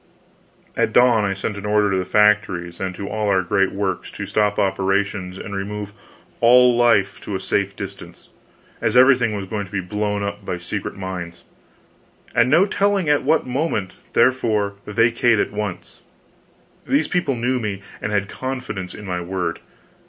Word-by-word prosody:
At -, -, 0 dB
dawn 120 Hz, -3 st, +5 dB
I 100 Hz, 0 st, -1 dB
sent 100 Hz, +1 st, -4 dB
an 100 Hz, -, -8 dB
order 105 Hz, -1 st, +2 dB
to 95 Hz, -, +1 dB
the 90 Hz, -, -1 dB
factories 105 Hz, -5 st, +2 dB
and 95 Hz, -1 st, -3 dB
to 100 Hz, -, -6 dB
all 110 Hz, 0 st, -2 dB
our 95 Hz, -1 st, +3 dB
great 95 Hz, +2 st, +1 dB
works 95 Hz, -2 st, -3 dB
to -, -, -5 dB
stop 105 Hz, -1 st, +1 dB
operations 95 Hz, -1 st, 0 dB
and 100 Hz, +1 st, -7 dB
remove 100 Hz, +1 st, -5 dB, 0.5 s
all 125 Hz, +1 st, +6 dB
life 115 Hz, -5 st, +3 dB
to 100 Hz, -, -5 dB
a -, -, -2 dB
safe 100 Hz, +1 st, -1 dB
distance, -, -, -9 dB, 0.5 s
as -, -, +1 dB
everything 125 Hz, -4 st, +5 dB
was 100 Hz, -1 st, -4 dB
going 100 Hz, 0 st, -4 dB
to -, -, -19 dB
be 100 Hz, -, -2 dB
blown 105 Hz, +2 st, -2 dB
up 100 Hz, 0 st, -4 dB
by 90 Hz, -, -3 dB
secret 90 Hz, +4 st, -5 dB
mines, 90 Hz, -3 st, -6 dB, 0.9 s
"and 120 Hz, +2 st, +3 dB
no 165 Hz, +7 st, +5 dB
telling 200 Hz, -4 st, +1 dB
at 145 Hz, -, +3 dB
what 155 Hz, +4 st, +2 dB
moment 125 Hz, -, -2 dB, 0.2 s
therefore, 110 Hz, -6 st, +2 dB
vacate 115 Hz, +2 st, +3 dB
at -, -, 0 dB
once." 100 Hz, -5 st, -6 dB, 0.9 s
These 145 Hz, +3 st, +2 dB
people 175 Hz, -7 st, 0 dB
knew 125 Hz, +2 st, 0 dB
me, 100 Hz, -4 st, -4 dB, 0.2 s
and 105 Hz, -, -3 dB
had 100 Hz, -1 st, 0 dB
confidence 125 Hz, -8 st, -5 dB
in 105 Hz, -, -10 dB
my 90 Hz, -2 st, -3 dB
word. 90 Hz, -1 st, -3 dB
105 Hz, 170 wpm, -21 LUFS, 95-120 Hz, 0.9 s, all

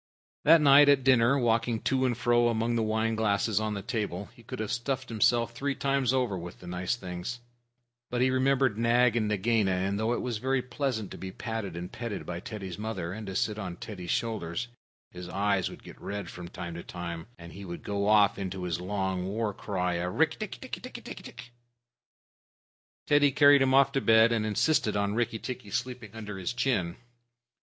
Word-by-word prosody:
That 160 Hz, +1 st, +7 dB
night 145 Hz, 0 st, +7 dB
at 140 Hz, -2 st, +4 dB
dinner, 130 Hz, 0 st, +5 dB
walking 115 Hz, -2 st, +1 dB
to 130 Hz, -1 st, +1 dB
and 120 Hz, -2 st, -1 dB
fro 120 Hz, 0 st, +3 dB
among 115 Hz, 0 st, 0 dB
the 115 Hz, -, +1 dB
wine 110 Hz, +1 st, 0 dB
glasses 110 Hz, -1 st, +1 dB
on 110 Hz, -1 st, -2 dB
the 100 Hz, -, -5 dB
table, 105 Hz, -5 st, -3 dB
he 120 Hz, -2 st, -18 dB
might -, -, -4 dB
have 110 Hz, -1 st, -3 dB
stuffed 130 Hz, +2 st, -2 dB
himself 115 Hz, +1 st, +2 dB
three 140 Hz, +3 st, -2 dB
times 135 Hz, -2 st, +1 dB
over 125 Hz, -6 st, +1 dB
with 90 Hz, 0 st, -8 dB
nice 90 Hz, +4 st, -2 dB
things. 90 Hz, +2 st, -6 dB, 0.7 s
But 120 Hz, 0 st, -1 dB
he 130 Hz, 0 st, +3 dB
remembered 130 Hz, -3 st, +2 dB
Nag 120 Hz, 0 st, +4 dB
and 110 Hz, -2 st, +1 dB
Nagaina, 105 Hz, 0 st, +1 dB
and 95 Hz, +2 st, 0 dB
though 110 Hz, +2 st, +1 dB
it -, -, -2 dB
was 120 Hz, -4 st, -3 dB
very 130 Hz, +1 st, 0 dB
pleasant 125 Hz, -4 st, -3 dB
to -, -, -8 dB
be 95 Hz, 0 st, -6 dB
patted 110 Hz, -4 st, -5 dB
and 90 Hz, +2 st, -6 dB
petted 115 Hz, -4 st, -5 dB
by 85 Hz, -1 st, -4 dB
Teddy's 95 Hz, -2 st, -7 dB
mother, 95 Hz, -6 st, -4 dB
and 105 Hz, 0 st, -7 dB
to 95 Hz, -, -5 dB
sit 105 Hz, +2 st, 0 dB
on 95 Hz, -4 st, -5 dB
Teddy's 90 Hz, -2 st, -8 dB
shoulder, 105 Hz, -8 st, -2 dB, 0.6 s
his 90 Hz, 0 st, -8 dB
eyes 100 Hz, 0 st, +1 dB
would -, -, -12 dB
get -, -, -13 dB
red 100 Hz, 0 st, -5 dB
from 90 Hz, -1 st, -8 dB
time 85 Hz, -1 st, -7 dB
to 85 Hz, -, -7 dB
time, 85 Hz, 0 st, -6 dB
and 85 Hz, 0 st, -11 dB
he 100 Hz, -, -9 dB
would 85 Hz, -2 st, -7 dB
go 100 Hz, 0 st, -1 dB
off 105 Hz, -2 st, +4 dB
into 95 Hz, -1 st, -4 dB
his 90 Hz, -1 st, -2 dB
long 95 Hz, -1 st, -2 dB
war 105 Hz, +1 st, -1 dB
cry 90 Hz, -3 st, -2 dB
of 90 Hz, +1 st, -3 dB
"Rikk -, -, +2 dB
tikk -, -, -5 dB
tikki -, -, -6 dB
tikki -, -, -8 dB
tchk!" 120 Hz, -, -10 dB, 1.6 s
Teddy 145 Hz, -1 st, +5 dB
carried 145 Hz, 0 st, +6 dB
him 130 Hz, 0 st, +4 dB
off 135 Hz, 0 st, +5 dB
to 135 Hz, -1 st, 0 dB
bed, 115 Hz, 0 st, +5 dB
and 110 Hz, -2 st, +1 dB
insisted 110 Hz, 0 st, +2 dB
on 100 Hz, 0 st, 0 dB
Rikki 115 Hz, 0 st, 0 dB
tikki 125 Hz, -2 st, -6 dB
sleeping 120 Hz, -1 st, -4 dB
under 105 Hz, -3 st, -6 dB
his 90 Hz, +5 st, -2 dB
chin. 115 Hz, -9 st, 0 dB
110 Hz, 200 wpm, -29 LUFS, 95-120 Hz, 1.6 s, That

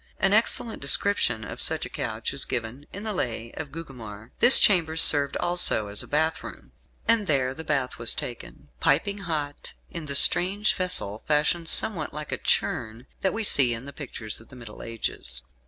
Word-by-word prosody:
An 195 Hz, +1 st, +1 dB
excellent 225 Hz, +1 st, 0 dB
description 140 Hz, -, +1 dB
of -, -, -6 dB
such -, -, +2 dB
a -, -, -9 dB
couch -, -, -6 dB
is -, -, 0 dB
given 125 Hz, +4 st, -5 dB
in 200 Hz, -, -9 dB
"The 215 Hz, -1 st, -4 dB
Lay 115 Hz, -, -5 dB
of 145 Hz, -, -9 dB
Gugemar." 120 Hz, -9 st, -11 dB
This 245 Hz, +2 st, +8 dB
chamber 170 Hz, -6 st, +3 dB
served 145 Hz, -4 st, +6 dB
also 175 Hz, -12 st, +3 dB
as 100 Hz, -, +2 dB
a -, -, -7 dB
bath 160 Hz, +2 st, -2 dB
room, -, -, -12 dB, 0.4 s
and 230 Hz, -3 st, +1 dB
there 130 Hz, -4 st, -1 dB
the 160 Hz, -, -10 dB
bath 140 Hz, -6 st, -3 dB
was 115 Hz, -1 st, +1 dB
taken, -, -, -9 dB
piping 200 Hz, 0 st, 0 dB
hot, 155 Hz, -6 st, -5 dB, 0.2 s
in 170 Hz, -4 st, -8 dB
the 140 Hz, -, -4 dB
strange 195 Hz, +8 st, +3 dB
vessel, 145 Hz, -, -4 dB
fashioned 155 Hz, +3 st, -1 dB
somewhat 165 Hz, -9 st, +2 dB
like 150 Hz, 0 st, -8 dB
a -, -, -3 dB
churn, 115 Hz, +2 st, -2 dB
that 190 Hz, -, -1 dB
we 225 Hz, -, -5 dB
see 130 Hz, -, +5 dB
in 130 Hz, +5 st, -10 dB
pictures 125 Hz, -8 st, -9 dB
of 115 Hz, -, -19 dB
the 130 Hz, -, -14 dB
Middle 115 Hz, -4 st, -12 dB
Ages. 65 Hz, -, -6 dB
145 Hz, 185 wpm, -24 LUFS, 115-175 Hz, 0.4 s, This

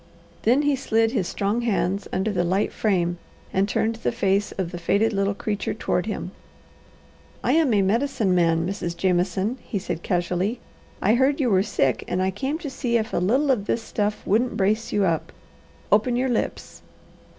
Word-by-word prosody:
Then 255 Hz, +6 st, +3 dB
he 290 Hz, -1 st, +3 dB
slid 225 Hz, -4 st, +1 dB
his 200 Hz, -8 st, -1 dB
strong 205 Hz, +4 st, -1 dB
hands 200 Hz, -4 st, 0 dB
under 190 Hz, +3 st, 0 dB
the 180 Hz, -3 st, 0 dB
light 190 Hz, +4 st, 0 dB
frame 175 Hz, -5 st, 0 dB, 0.3 s
and 195 Hz, +2 st, +1 dB
turned 225 Hz, +2 st, 0 dB
the -, -, -1 dB
face 200 Hz, -3 st, +1 dB
of 185 Hz, -3 st, -3 dB
the 175 Hz, -, -6 dB
faded 205 Hz, +6 st, +1 dB
little 200 Hz, 0 st, 0 dB
creature 205 Hz, 0 st, -2 dB
toward -, -, -1 dB
him. -, -, -4 dB, 1.1 s
"I -, -, +2 dB
am 315 Hz, -4 st, +3 dB
a 205 Hz, -3 st, +3 dB
Medicine 220 Hz, -1 st, +1 dB
Man, 165 Hz, -2 st, +2 dB
Mrs. 175 Hz, -3 st, -4 dB
Jameson," 190 Hz, +6 st, 0 dB
he 210 Hz, -, -4 dB
said 180 Hz, -3 st, -4 dB
casually. 180 Hz, +6 st, -1 dB, 0.4 s
"I 210 Hz, -, +4 dB
heard 270 Hz, +4 st, +2 dB
you 250 Hz, -5 st, +2 dB
were 190 Hz, -1 st, +4 dB
sick 135 Hz, -, 0 dB
and 180 Hz, -, -1 dB
I 190 Hz, +1 st, +1 dB
came 270 Hz, -, -2 dB
to -, -, -2 dB
see 245 Hz, -3 st, 0 dB
if 225 Hz, +1 st, -3 dB
a -, -, +1 dB
little 260 Hz, +11 st, +2 dB
of 215 Hz, -5 st, -1 dB
this 230 Hz, -, 0 dB
stuff 210 Hz, -1 st, -2 dB
wouldn't 225 Hz, +3 st, +1 dB
brace 215 Hz, +2 st, +1 dB
you 205 Hz, -1 st, +2 dB
up. 165 Hz, -3 st, -1 dB, 0.6 s
Open 215 Hz, +4 st, +3 dB
your 255 Hz, +2 st, +1 dB
lips." 240 Hz, -, -3 dB
205 Hz, 185 wpm, -24 LUFS, 185-235 Hz, 1.1 s, I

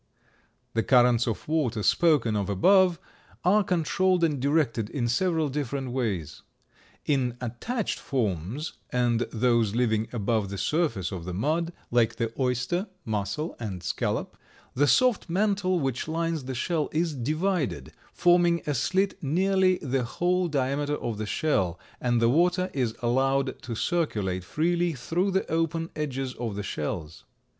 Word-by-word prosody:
The 115 Hz, -, +2 dB
currents 120 Hz, -1 st, +4 dB
of 115 Hz, -, -3 dB
water 140 Hz, -9 st, 0 dB
spoken 145 Hz, -10 st, +3 dB
of 100 Hz, -1 st, -1 dB
above 180 Hz, -, +4 dB, 0.5 s
are 205 Hz, +4 st, +5 dB
controlled 180 Hz, +1 st, +1 dB
and 150 Hz, -4 st, +2 dB
directed 135 Hz, -6 st, +1 dB
in 120 Hz, -3 st, -1 dB
several 160 Hz, +5 st, +1 dB
different 135 Hz, -2 st, -3 dB
ways. 105 Hz, -, -3 dB, 0.6 s
In 125 Hz, -4 st, 0 dB
attached 155 Hz, -, -3 dB
forms, 110 Hz, -, -2 dB, 0.2 s
and 120 Hz, -2 st, +1 dB
those 115 Hz, -2 st, +2 dB
living 110 Hz, -2 st, +1 dB
above 110 Hz, -3 st, 0 dB
the 100 Hz, -, -5 dB
surface 115 Hz, -, 0 dB
of 90 Hz, -4 st, -6 dB
the 90 Hz, -1 st, -4 dB
mud, 160 Hz, -, 0 dB, 0.2 s
like 120 Hz, -2 st, +3 dB
the 115 Hz, -1 st, -2 dB
oyster, 125 Hz, -, 0 dB, 0.2 s
mussel 110 Hz, -, -2 dB
and 95 Hz, -6 st, -5 dB
scallop, 90 Hz, -, -2 dB, 0.4 s
the 145 Hz, +3 st, +2 dB
soft 250 Hz, -, +3 dB
mantle 190 Hz, -1 st, +1 dB
which 135 Hz, -3 st, -2 dB
lines 165 Hz, -2 st, -2 dB
the 130 Hz, 0 st, -4 dB
shell 155 Hz, +4 st, -1 dB
is 160 Hz, 0 st, 0 dB
divided, 150 Hz, -, -1 dB, 0.2 s
forming 175 Hz, -1 st, +3 dB
a 150 Hz, -, 0 dB
slit 190 Hz, -, 0 dB
nearly 185 Hz, +5 st, +2 dB
the 135 Hz, -2 st, 0 dB
whole 180 Hz, +9 st, 0 dB
diameter 145 Hz, 0 st, 0 dB
of 115 Hz, -6 st, -4 dB
the 110 Hz, -, -3 dB
shell, 95 Hz, -, 0 dB, 0.2 s
and 120 Hz, -1 st, +1 dB
the 115 Hz, -, +4 dB
water 180 Hz, +7 st, +2 dB
is 125 Hz, -5 st, -1 dB
allowed 135 Hz, +2 st, +1 dB
to 115 Hz, -, -5 dB
circulate 105 Hz, -, -1 dB
freely 170 Hz, -, 0 dB
through 165 Hz, +9 st, -1 dB
the 190 Hz, 0 st, 0 dB
open 165 Hz, 0 st, -1 dB
edges 135 Hz, -4 st, -3 dB
of 115 Hz, -4 st, -4 dB
the 105 Hz, -, -4 dB
shells. 75 Hz, -2 st, -4 dB
135 Hz, 145 wpm, -27 LUFS, 115-170 Hz, 0.6 s, are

